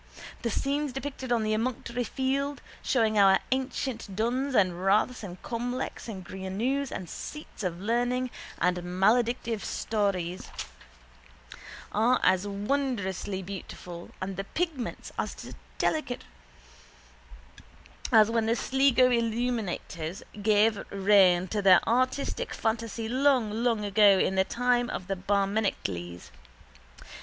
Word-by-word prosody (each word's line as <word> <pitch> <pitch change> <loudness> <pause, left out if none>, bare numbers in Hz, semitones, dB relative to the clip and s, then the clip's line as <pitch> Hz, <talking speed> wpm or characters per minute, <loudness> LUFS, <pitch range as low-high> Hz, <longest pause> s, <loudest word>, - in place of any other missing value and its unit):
The 235 - -1
scenes 280 +5 -1
depicted 270 -1 -5
on 235 -2 +2
the 215 0 0
emunctory 235 +1 -2
field, 275 +2 -1 0.2
showing 220 -4 +2
our 195 -1 +7
ancient 260 -5 -2
duns 255 +5 0
and 185 -3 +2
raths 210 +6 +2
and 185 -4 -8
cromlechs 245 +2 -4
and 190 -5 -7
grianauns 220 +10 -2
and 185 - -5
seats 300 - -8
of 175 -3 -3
learning 245 +4 0 0.3
and 180 +1 +2
maledictive 220 +5 +1
stones, 190 -5 -2 1.4
are 235 +4 +3
as 190 +2 +3
wonderfully 200 -3 -2
beautiful 180 -2 -8
and 190 0 -4
the 195 - -2
pigments 310 - -3
as - - -4 0.2
delicate 305 -6 -1 1.9
as 220 -2 +6
when 230 -1 +1
the 230 - +2
Sligo 260 0 +3
illuminators 225 -7 -2 0.2
gave 215 0 +3
free 200 - -8
rein 190 -2 +5
to 210 +1 -1
their 190 -2 +6
artistic 255 +4 0
fantasy 225 0 -2
long 255 -2 +2
long 230 -4 +1
ago 205 -1 +6
in 190 - +2
the 190 0 +2
time 245 +3 +1
of 185 - -4
the 195 +1 -2
Barmecides. 195 - -1
220 Hz, 120 wpm, -28 LUFS, 195-250 Hz, 1.9 s, our